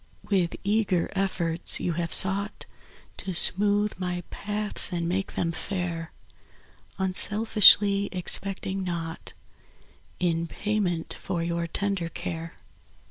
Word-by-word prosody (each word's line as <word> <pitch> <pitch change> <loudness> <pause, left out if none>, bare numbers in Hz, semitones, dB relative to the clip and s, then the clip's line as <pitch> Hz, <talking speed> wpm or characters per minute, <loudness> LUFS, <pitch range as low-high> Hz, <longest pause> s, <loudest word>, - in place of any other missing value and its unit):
% - - -20
W 190 -3 +3
ITH 170 - -8
eager 200 -4 0
efforts 180 -4 0
you 175 - -2
Have 170 0 -3
sougkt 195 +4 +1 0.5
To 190 - -5
smootk 205 +3 +5
my 180 -1 -3
paths 210 0 0
and 170 -1 -2
make 190 +3 -2
them 165 - -1
fair, 175 -2 -5 0.9
Unselfiskly 200 +1 +4
expect 190 +1 +1
5 190 - -3
mg 195 - -3
naugkt 165 -2 -6 0.9
In 170 -2 0
payment 190 -3 -2
for 175 -3 -4
your 170 0 -2
tender 195 -1 -3
care. 165 -1 -6
185 Hz, 125 wpm, -26 LUFS, 170-200 Hz, 0.9 s, smootk